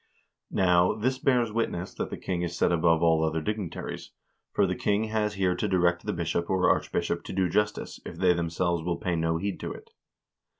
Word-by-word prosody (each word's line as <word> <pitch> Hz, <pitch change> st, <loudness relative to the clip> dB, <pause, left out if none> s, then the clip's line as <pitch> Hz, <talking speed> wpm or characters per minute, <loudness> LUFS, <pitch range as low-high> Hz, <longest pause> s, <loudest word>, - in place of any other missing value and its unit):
Now, 90 Hz, -1 st, +3 dB
this 130 Hz, +4 st, -1 dB
bears 125 Hz, -4 st, +2 dB
witness 95 Hz, -5 st, -2 dB
that -, -, -4 dB
the -, -, -5 dB
king 90 Hz, -2 st, -3 dB
is 85 Hz, -1 st, -3 dB
set -, -, +3 dB
above 85 Hz, -1 st, +3 dB
all 80 Hz, -1 st, +4 dB
other 80 Hz, 0 st, 0 dB
dignitaries; 100 Hz, +2 st, -4 dB, 0.4 s
for 100 Hz, -, +3 dB
the 90 Hz, -1 st, -1 dB
king 105 Hz, +3 st, +1 dB
has 110 Hz, -1 st, -1 dB
here 95 Hz, -2 st, +2 dB
to 105 Hz, -, -1 dB
direct 90 Hz, -2 st, +1 dB
the -, -, +1 dB
bishop 85 Hz, 0 st, -2 dB
or 95 Hz, -1 st, +2 dB
archbishop -, -, -1 dB
to -, -, -6 dB
do 95 Hz, -1 st, +2 dB
justice, 105 Hz, +4 st, -1 dB
if -, -, -8 dB
they 90 Hz, -1 st, +4 dB
themselves 85 Hz, 0 st, -1 dB
will 85 Hz, 0 st, -1 dB
pay 90 Hz, 0 st, -1 dB
no 80 Hz, 0 st, 0 dB
heed 100 Hz, +3 st, -3 dB
to -, -, -4 dB
it. -, -, -11 dB
90 Hz, 205 wpm, -27 LUFS, 85-105 Hz, 0.4 s, all